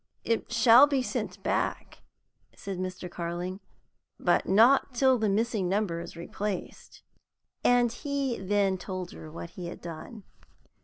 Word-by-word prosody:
"It 230 0 -1
shall 235 +3 +7
be 275 -3 0
sent 210 -7 -4
back," - - -2 0.5
said 195 -2 -6
Mr. 185 -1 -4
Carling, 175 +2 -4 0.6
"but - - +2
not 245 +6 +5
till 260 0 +4
the 215 -1 +1
missing 210 -2 0
number 195 -4 0
is 170 0 -8
replaced." 190 +3 -6 0.6
And 245 -1 +4
he 275 0 -2
then 195 -1 +1
told 185 -1 -5
her 155 - -10
what 170 +1 -8
he 180 -2 -7
had - - -8
done. 175 +6 -9
200 Hz, 140 wpm, -28 LUFS, 180-235 Hz, 0.6 s, shall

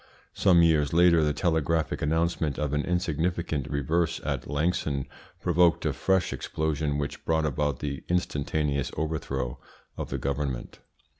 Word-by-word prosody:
Some 90 -4 +5
years 75 -3 +3
later 85 -1 +5
the 75 - +2
telegraphic 80 0 0
announcement 80 -1 0
of 75 -1 -1
an 75 0 +1
insignificant 85 -3 -1
reverse 80 +4 0
at 70 -5 -2
Langson 75 -2 0 0.3
provoked 90 -1 +3
a - - +1
fresh 95 -2 +1
explosion 75 -2 -1
which 70 -2 -4
brought 80 -1 +1
about 75 -2 -1
the 70 -1 -4
instantaneous 75 -5 0
overthrow 70 -5 -2 0.4
of - - -4
the - - -2
government. 70 -2 -3
75 Hz, 135 wpm, -27 LUFS, 70-85 Hz, 0.4 s, Some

